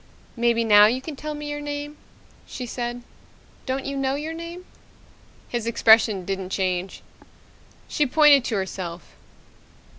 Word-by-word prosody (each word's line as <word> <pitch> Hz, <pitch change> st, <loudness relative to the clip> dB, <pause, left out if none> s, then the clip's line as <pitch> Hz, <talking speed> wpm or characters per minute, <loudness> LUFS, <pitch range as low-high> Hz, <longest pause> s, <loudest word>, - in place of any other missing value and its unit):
"Maybe 235 Hz, -1 st, +2 dB
now 210 Hz, -2 st, +7 dB
you 245 Hz, +4 st, 0 dB
can 290 Hz, +3 st, -8 dB
tell 300 Hz, +2 st, -6 dB
me 295 Hz, 0 st, -7 dB
your 295 Hz, 0 st, -4 dB
name," 290 Hz, 0 st, -5 dB, 0.5 s
she 250 Hz, -, -6 dB
said. 240 Hz, 0 st, -5 dB, 0.6 s
"Don't 265 Hz, +1 st, -2 dB
you 280 Hz, -, -4 dB
know 270 Hz, 0 st, -1 dB
your 305 Hz, +3 st, -4 dB
name?" 335 Hz, +2 st, -8 dB, 0.8 s
His 235 Hz, -2 st, -3 dB
expression 220 Hz, -4 st, +4 dB
didn't 190 Hz, -1 st, -4 dB
change. 185 Hz, -1 st, -2 dB, 0.8 s
She 295 Hz, -, 0 dB
pointed 295 Hz, -1 st, +6 dB
to 225 Hz, -, -2 dB
herself. 185 Hz, -3 st, -5 dB
245 Hz, 140 wpm, -23 LUFS, 210-290 Hz, 0.8 s, now